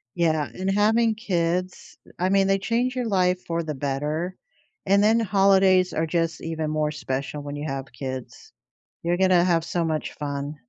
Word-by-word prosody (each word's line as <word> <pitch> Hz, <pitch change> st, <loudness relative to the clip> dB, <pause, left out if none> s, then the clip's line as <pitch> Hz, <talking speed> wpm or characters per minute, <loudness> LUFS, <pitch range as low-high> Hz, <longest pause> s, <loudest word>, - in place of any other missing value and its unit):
Yeah, 160 Hz, -4 st, +1 dB
and 190 Hz, +1 st, -2 dB
having 220 Hz, +3 st, +3 dB
kids, 180 Hz, -3 st, -2 dB, 0.2 s
I 185 Hz, -, +1 dB
mean, 195 Hz, 0 st, +3 dB
they 195 Hz, 0 st, +2 dB
change 240 Hz, +5 st, 0 dB
your 250 Hz, -2 st, -2 dB
life 185 Hz, -3 st, +1 dB
for 170 Hz, 0 st, -1 dB
the 155 Hz, -1 st, -4 dB
better, 150 Hz, +6 st, -2 dB, 0.5 s
and 200 Hz, +1 st, +4 dB
then 220 Hz, +2 st, +4 dB
holidays 195 Hz, -3 st, +4 dB
are 160 Hz, -, 0 dB
just 165 Hz, 0 st, -1 dB
even 160 Hz, -1 st, -3 dB
more 155 Hz, 0 st, 0 dB
special 140 Hz, 0 st, -4 dB
when 145 Hz, 0 st, -6 dB
you 145 Hz, +1 st, -4 dB
have 135 Hz, -1 st, -5 dB
kids. 135 Hz, -, -7 dB, 0.5 s
You're 175 Hz, +1 st, +1 dB
gonna 185 Hz, -2 st, +4 dB
have 170 Hz, -3 st, +2 dB
so 170 Hz, 0 st, -1 dB
much 155 Hz, -2 st, -2 dB
fun. 145 Hz, 0 st, -4 dB
175 Hz, 175 wpm, -24 LUFS, 150-195 Hz, 0.5 s, and